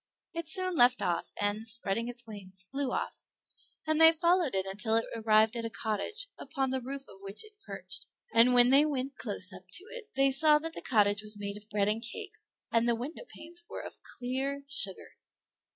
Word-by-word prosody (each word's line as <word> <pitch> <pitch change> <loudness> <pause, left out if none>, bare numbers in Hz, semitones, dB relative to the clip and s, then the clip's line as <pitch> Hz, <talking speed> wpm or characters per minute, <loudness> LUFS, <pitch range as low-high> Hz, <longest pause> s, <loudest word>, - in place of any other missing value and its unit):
It 335 -1 -5
soon 370 +2 0
left 250 -2 +5
off, 175 -1 -1
and 205 +2 -1
spreading 225 0 +2
its 240 -1 -6
wings, 190 -4 -3
flew 270 +6 -2
off; - - -4 0.6
and 315 0 +2
they 325 0 +11
followed 340 - +2
it 190 0 0
until 210 +3 0
it 230 - +3
arrived 220 0 +3
at 230 - -3
a 230 - -3
cottage, 220 - -3
upon 270 -1 -2
the 260 0 -1
roof 275 +2 -6
of 195 - -15
which 200 - -7
it 425 -1 -19
perched; - - -6 0.3
and 235 +2 +6
when 245 +1 +6
they 280 +2 +7
went 275 -3 -2
close 200 -3 +2
up 185 0 -11
to 370 - -1
it 485 -4 -9
they 270 0 +4
saw 300 +3 +5
that 325 +2 -4
the - - -7
cottage 205 -4 +2
was 210 0 -3
made 200 0 -5
of 210 +1 -10
bread 205 -1 +1
and 215 +2 +1
cakes, 420 - -7
and 230 +1 +2
the 235 - +3
windowpanes 330 - -8
were - - -6
of - - -9 0.2
clear 270 +3 -3
sugar. 195 -9 -4
245 Hz, 200 wpm, -30 LUFS, 210-300 Hz, 0.6 s, they